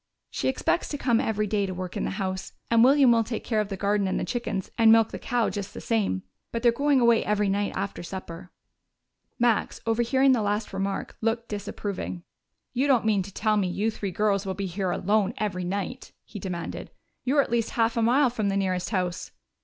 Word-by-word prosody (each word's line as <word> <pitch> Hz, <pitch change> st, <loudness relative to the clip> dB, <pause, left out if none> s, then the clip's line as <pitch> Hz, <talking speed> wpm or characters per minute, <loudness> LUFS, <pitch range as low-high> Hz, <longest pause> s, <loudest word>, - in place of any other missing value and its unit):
"She -, -, -2 dB
expects 265 Hz, +6 st, 0 dB
to 290 Hz, -, -3 dB
come 240 Hz, -5 st, +2 dB
every 215 Hz, -1 st, 0 dB
day 205 Hz, -1 st, 0 dB
to 185 Hz, -, -5 dB
work 185 Hz, -1 st, -5 dB
in -, -, -1 dB
the -, -, -1 dB
house, 190 Hz, -2 st, -3 dB, 0.2 s
and 230 Hz, 0 st, +6 dB
William 270 Hz, 0 st, +6 dB
will 230 Hz, -1 st, +4 dB
take 225 Hz, 0 st, -4 dB
care 220 Hz, -3 st, 0 dB
of 205 Hz, -, -4 dB
the 195 Hz, -, -4 dB
garden 200 Hz, 0 st, +1 dB
and 190 Hz, -, -1 dB
the -, -, -2 dB
chickens 225 Hz, -6 st, -3 dB
and 225 Hz, -1 st, +6 dB
milk 225 Hz, -1 st, +5 dB
the -, -, -6 dB
cow 245 Hz, -3 st, 0 dB
just 200 Hz, -2 st, -6 dB
the -, -, -5 dB
same. 205 Hz, -, 0 dB, 0.3 s
But 230 Hz, 0 st, -3 dB
they're 240 Hz, -, +6 dB
going 280 Hz, +3 st, +2 dB
away 235 Hz, -2 st, +4 dB
every 210 Hz, -1 st, +1 dB
night 200 Hz, +1 st, 0 dB
after 200 Hz, -, -3 dB
supper." 175 Hz, -1 st, -8 dB, 0.9 s
Max, 240 Hz, -3 st, +1 dB
overhearing 240 Hz, +4 st, +3 dB
the 245 Hz, -3 st, +3 dB
last 210 Hz, +1 st, -1 dB
remark, 195 Hz, 0 st, -3 dB
looked 230 Hz, +1 st, -1 dB
disapproving. 200 Hz, -3 st, -5 dB, 0.5 s
"You 260 Hz, +3 st, +1 dB
don't 255 Hz, -5 st, +3 dB
mean 210 Hz, -3 st, +3 dB
to 195 Hz, +2 st, -7 dB
tell 215 Hz, +2 st, +1 dB
me 195 Hz, -3 st, +1 dB
you 205 Hz, +5 st, 0 dB
three 205 Hz, -2 st, -4 dB
girls 200 Hz, +1 st, +1 dB
will 190 Hz, -2 st, -3 dB
be 200 Hz, -, -3 dB
here 190 Hz, +1 st, -2 dB
alone 200 Hz, +3 st, +1 dB
every 185 Hz, -4 st, -2 dB
night?" 200 Hz, +7 st, -4 dB
he 210 Hz, -1 st, -9 dB
demanded. 175 Hz, -3 st, -5 dB, 0.3 s
"You're 280 Hz, +2 st, +3 dB
at -, -, -9 dB
least 235 Hz, -1 st, +1 dB
half 230 Hz, 0 st, +2 dB
a 230 Hz, -, +1 dB
mile 250 Hz, +3 st, +4 dB
from 215 Hz, -4 st, -1 dB
the 195 Hz, -, 0 dB
nearest 185 Hz, -2 st, -1 dB
house." 180 Hz, -4 st, -2 dB
210 Hz, 215 wpm, -26 LUFS, 195-235 Hz, 0.9 s, and